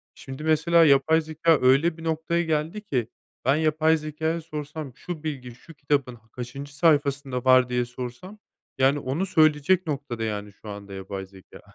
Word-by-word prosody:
Şimdi 135 +2 -9
mesela 160 +2 +4
yapay 150 +3 +4
zekâ 160 0 +2
öyle 140 +6 +4
bir 165 - -10
noktaya 165 +1 0
geldi 160 +5 -2
ki 125 - -2 0.4
ben 135 +2 +4
yapay 155 +1 +2
zekâya 160 +2 -3
sorsam 150 -3 -7
şu 170 -4 -7
bilgi 125 -6 -5
şu 165 +6 -15
kitabın 140 -3 -1 0.2
kaçıncı 135 +4 -8
sayfasında 140 -5 +1
var 130 -1 +5
diye 125 0 0
sorsam 125 - -8 0.4
yani 135 +2 +3
onu 140 +9 -2
söyleyecek 160 +2 +3
noktada, 135 -6 -4
yani, 105 -1 -4
şu 105 - -12
anda 100 -1 -8
yapay 95 0 -6
zekâ. 95 -1 -16
145 Hz, 160 wpm, -25 LUFS, 125-160 Hz, 0.4 s, var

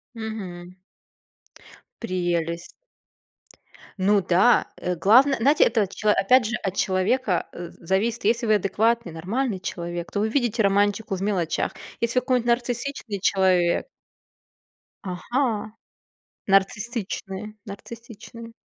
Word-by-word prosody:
Мгм. 185 -6 -7 1.3
Прелесть. 175 -4 -2 1.3
Ну 200 +1 +3
да! 185 +7 +4
Э, 180 0 -2
главное, 250 - +5
знаете, 285 +6 +4
это 220 - +2
от 195 - -6
чело 210 -1 +2
опять 235 +5 +4
же 235 +2 -1
от 190 -1 -2
человека, 190 +2 +1
э, 175 -1 -7
з - - -19
зависит, 220 +5 0
если 230 +2 +2
вы 215 - +5
адекватный, 215 +1 +1
нормальный 195 +6 -2
человек, 175 -3 -5
то 205 - -2
вы 215 +2 +1
видите 235 -3 +1
романтику 205 +1 +1
в 185 - -7
мелочах. 185 -6 -1 0.3
Если 235 +2 0
вы - - -7
какой-нибудь 250 -2 0
нарциссичный 240 -2 -2
человек. 185 - +2 1.2
Ага, 220 +2 -2 0.8
нарциссичный, 210 -1 -1
нарциссичный. 230 +2 -10
210 Hz, 115 wpm, -24 LUFS, 185-235 Hz, 1.3 s, главное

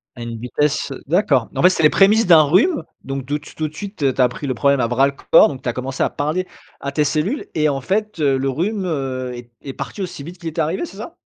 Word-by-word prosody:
À 120 - -10
une 115 -1 -5
vitesse 130 +5 -1
heu, - - -7
d'accord, - - +2
en - - 0
fait, 180 - +8
c'est 180 - -1
les 150 - +6
prémices 210 +2 +4
d'un 165 -3 +8
rhume, 200 - +3 0.2
donc 135 -1 -5
de 145 +2 -1
tout - - -14
tout 155 -1 -2
de 150 - -12
suite, 160 -7 -2
tu 130 - 0
as 125 - +5
pris 140 - -7
le 130 - -1
problème 140 +2 +2
à 115 - +1
bras 130 +3 +3
le 140 - -4 0.2
corps, - - +8
donc 135 -3 -7
tu - - -1
as 120 - -2
commencé 130 +1 -3
à - - +1
parler 155 +6 -1 0.4
à 140 - -3
tes 150 +1 +1
cellules 165 - -1
et 155 -1 +2
en 135 -2 -1
fait, 210 +4 -2
heu, 140 -3 +2
le 135 - -1
rhume, 190 - -1
heu, 130 -6 -3
est 120 -1 -10
est 135 - -6
parti 200 - -5
aussi 170 -5 -6
vite 170 +5 -9
qu'il 170 -2 -5
était 160 +1 -2
arrivé 160 +5 -1
c'est 190 - -12
ça? 270 +11 -8
150 Hz, 280 wpm, -20 LUFS, 135-180 Hz, 0.4 s, fait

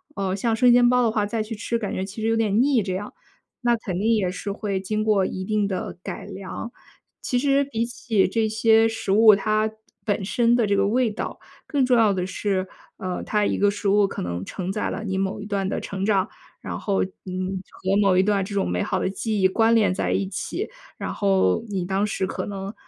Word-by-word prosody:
呃， 190 -5 -1
像 225 +4 0
生 245 +2 +5
煎 240 0 +6
包 250 0 +3
的 230 - +2
话， 210 -2 +1
再 215 +1 -2
去 220 +1 -7
吃 230 +2 -2
感 210 -4 -4
觉 190 - -2
其 205 +3 -8
实 220 - +1
有 225 - +2
点 220 0 +2
腻 265 -3 +3
这 190 -2 -3
样， 200 +3 -5 0.5
那 240 -1 +3
肯 190 -6 -4
定 225 +3 +2
也 190 -4 0
是 200 +2 -5
会 200 -1 -2
经 215 +3 -2
过 210 -3 +3
一 185 - -4
定 210 +1 0
的 190 -3 -4
改 - - -6
良。 195 +4 -7 0.5
其 250 - -1
实 275 +2 +2
比 230 -4 -2
起 230 -4 0
这 220 +2 +1
些 220 +1 +4
食 225 -3 -3
物 215 +1 +7
它 215 +2 +1 0.4
本 205 -2 0
身 235 +4 +2
的 240 -2 +2
这 200 -1 +1
个 195 0 +3
味 240 +1 +2
道， 210 - -5 0.3
更 280 -3 +2
重 250 -1 +3
要 220 -3 +4
的 180 -1 -1
是， 190 0 -1 0.3
呃， 185 -1 -4
它 210 -1 +1
一 - - 0
个 205 - +3
食 205 0 -2
物 205 0 +4
可 - - -6
能 90 +1 -4
承 185 - -4
载 210 - -2
了 225 - -4
你 190 -3 -2
某 190 +1 -2
一 - - -7
段 200 -2 -1
的 - - -2
成 195 0 -4
长， 200 -3 +2 0.3
然 - - -5
后， 200 -2 0
嗯， 185 0 -5
和 190 +1 -1
某 195 -2 +4
一 185 - +4
段 205 +1 +2
的 195 - 0
这 200 - -6
种 195 - 0
美 90 0 -1
好 - - -1
的 - - 0
记 210 +1 -2
忆 190 - +6
关 225 +4 +3
联 215 -5 +3
在 185 - -1
一 200 - 0
起。 350 - -4 0.3
然 - - -4
后 195 - +2
你 195 -4 -2
当 195 +3 0
时 195 -2 -1
可 - - -4
能， 195 0 -5
205 Hz, 255 characters per minute, -24 LUFS, 190-225 Hz, 0.5 s, 物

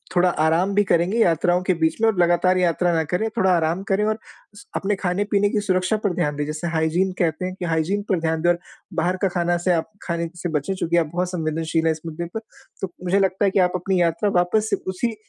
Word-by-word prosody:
थोड़ा 180 0 +4
आराम 165 +5 +1
भी 205 - +4
करेंगे 185 +4 +1
यात्राओं 175 -1 +3
के 185 0 +2
बीच 160 -1 +1
में 225 - +4
और 200 - -2
लगातार 175 +1 +3
यात्रा 175 0 +2
न - - +1
करें 200 +5 +1
थोड़ा 190 -4 +3
आराम 165 +3 0
करें 195 +2 +2
और 215 0 0 0.4
स - - -13
अपने 200 +1 0
खाने-पीने 200 +2 0
की 210 - 0
सुरक्षा 185 +1 +1
पर 190 - +2
ध्यान 150 -4 0
दें 145 0 -2
जिसे 155 +3 -4
हाइजीन 165 +4 +1
कहते 170 +1 0
हैं 185 0 -4
कि 180 - -3
हाइजीन 165 +5 0
पर 185 -4 +2
ध्यान 160 -1 -1
दें 175 - +3
और 175 0 +2 0.3
बाहर 175 +3 0
का - - +5
खाना 175 0 +1
से 180 - +4
आप 165 - -1
खाने 170 -1 -2
से 175 0 -4
बचें 150 +7 -3
चूँकि 170 -2 0
आप 160 -2 +1
बहुत 180 +1 -1
संवेदनशील 160 -1 -1
हैं 160 - +4
इस 155 - -11
मुद्दे 165 +1 -5
पर - - 0 0.4
तो 180 -2 -4
मुझे 185 +2 +2
लगता 195 +1 +1
है 195 - +2
कि 190 - +2
आप - - -9
अपनी 180 0 0
यात्रा 170 +4 +1
वापस 210 +5 +1
से - - +4
उसी 220 +5 -2
175 Hz, 245 wpm, -22 LUFS, 165-190 Hz, 0.4 s, का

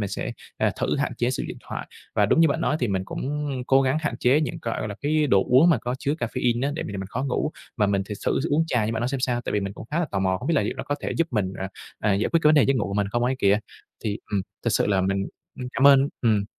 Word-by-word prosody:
mình 100 - -1
sẽ, - - -4 0.3
ờ, - - +2
thử - - +1
hạn - - -1
chế 120 +1 +1
sử 130 - -2
dụng - - -7
thoại. - - -5 0.3
Và 105 - +3
đúng 135 - +3
như 165 - +6
bạn 140 - -1
nói 150 - +1
thì 120 - +1
mình 95 -2 -1
cũng 130 - -4 0.4
cố 135 0 +5
gắng 130 +2 +1
hạn 150 - -2
chế 130 +5 +3
những, 155 - -2
gọi 115 - -2
gọi 110 - -3
là, 100 - -5
cái 150 +1 +2
đồ 100 -8 +4
uống 135 +8 +6
mà 155 - +3
có 120 +2 -3
chứa 145 - -1
caffeine 120 0 0
á 145 - -1
để - - -3
m - - -6
làm 100 -1 -4
mình 95 - -5
khó 125 +7 -3
ngủ, 140 +3 -1 0.3
mà 105 -3 +3
mình 100 -1 +1
thì 105 - -4
xử - - -1
thử 165 - -1
uống 155 +3 +3
trà 125 -8 +1
như 110 - -1
bạn 110 - -2
nói 120 - 0
xem 135 0 -2
sao. 125 -1 0
Tại - - -4
vì 105 - +1
mình 100 0 -3
cũng - - -9
khá 155 - 0
là 175 - +1
tò 100 - -1
mò, 95 -1 +1
không 130 - -5
biết 170 - +3
là - - +3
liệu - - -2
nó - - -4
có 145 - -1
thể - - -3
giúp 165 - +2
mình, 100 -6 -1
ờ, 95 - -2 0.3
ờ, 105 -2 +2
giải 100 - +1
quyết 165 - +4
cái 150 - +6
vấn 155 - +6
đề 145 - +6
giấc 135 - +3
ngủ 110 - 0
của 100 - -4
mình 100 -1 +1
không 120 +4 0
ấy 130 - +1
kìa. 100 -3 +4 0.5
Thì, 105 -1 -1
ừm, 100 -2 0 0.2
thực - - +2
sự - - +2
là 100 -2 +2
mình, 95 +1 0 0.3
ừm, 125 - -4
cảm 135 - +4
ơn 140 0 +7
ừm, 110 -4 +2
120 Hz, 335 wpm, -25 LUFS, 100-140 Hz, 0.5 s, ơn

